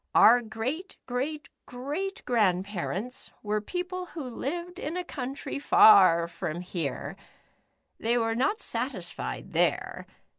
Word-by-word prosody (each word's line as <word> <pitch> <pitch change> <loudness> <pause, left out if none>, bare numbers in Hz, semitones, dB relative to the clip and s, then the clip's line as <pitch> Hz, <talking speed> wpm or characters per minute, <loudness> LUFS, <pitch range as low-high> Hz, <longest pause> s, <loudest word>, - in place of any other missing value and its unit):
Our 240 +2 +8
great 240 - -4
great 280 +4 -3 0.2
great 300 - -4
grandparents 205 +1 -1
were 210 0 0
people 360 - -4
who 325 -4 -7
lived 340 +8 -5
in 320 +4 -3
a 360 - -2
country 275 -2 -5
far 185 -11 +7
from 170 0 -4
here. 170 -7 -4 0.8
They 235 +2 +1
were 225 -1 +1
not 270 - +1
satisfied 205 - -4
there. - - 0
245 Hz, 115 wpm, -28 LUFS, 205-305 Hz, 0.8 s, Our